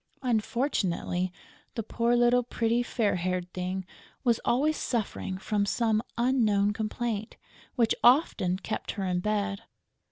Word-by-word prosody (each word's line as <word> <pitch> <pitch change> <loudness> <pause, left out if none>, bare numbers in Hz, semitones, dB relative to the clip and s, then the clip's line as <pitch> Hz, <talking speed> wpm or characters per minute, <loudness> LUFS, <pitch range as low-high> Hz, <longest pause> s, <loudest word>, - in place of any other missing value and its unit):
Unfortunately, 215 -7 0 0.4
the 225 - -2
poor 235 +2 +1
little 240 +1 +4
pretty, 235 0 0
fair 225 -5 0
haired 180 0 -2
thing 185 +1 -3 0.4
was 235 -3 +2
always 295 +6 +2
suffering 215 -7 -2
from 205 +1 0
some 220 +1 +1 0.2
unknown 220 -5 +3
complaint, 220 0 -3 0.4
which 235 -4 +3
often 240 - +4
kept 215 +2 -4
her 195 -3 -3
in 180 -1 0
bed. 205 0 -1
215 Hz, 125 wpm, -28 LUFS, 190-240 Hz, 0.4 s, little